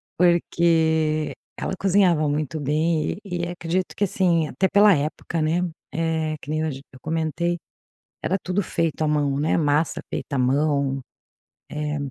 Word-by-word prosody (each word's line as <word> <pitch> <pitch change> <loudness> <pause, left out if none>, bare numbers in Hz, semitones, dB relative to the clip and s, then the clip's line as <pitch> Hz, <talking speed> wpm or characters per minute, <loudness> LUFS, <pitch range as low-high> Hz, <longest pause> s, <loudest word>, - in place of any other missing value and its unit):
porque 160 -3 +2 0.2
ela - - -3
cozinhava 180 -6 +3
muito 150 +1 -2
bem, 155 +4 0
e 175 -3 -2
e - - -4
acredito 175 +1 -2
que, - - +1
assim, 175 -5 +2
até 190 - +1
pela 205 0 +7
época, 155 +2 -2
né? 160 +3 +1 0.3
Eh, 160 -1 -1
que 145 - -7
nem 155 0 0
hoje 140 -4 -3
eu 130 - -13
comentei, 165 +2 -1 0.7
era 190 - +1
tudo 185 +3 -1
feito 165 -3 -1
à 155 - +2
mão, 145 -2 +1
né? 155 - +2
Massa 150 0 +1
feita 140 - -4
à - - 0
mão. 140 +1 +1 0.7
É. 150 0 -3
160 Hz, 155 wpm, -23 LUFS, 150-170 Hz, 0.7 s, pela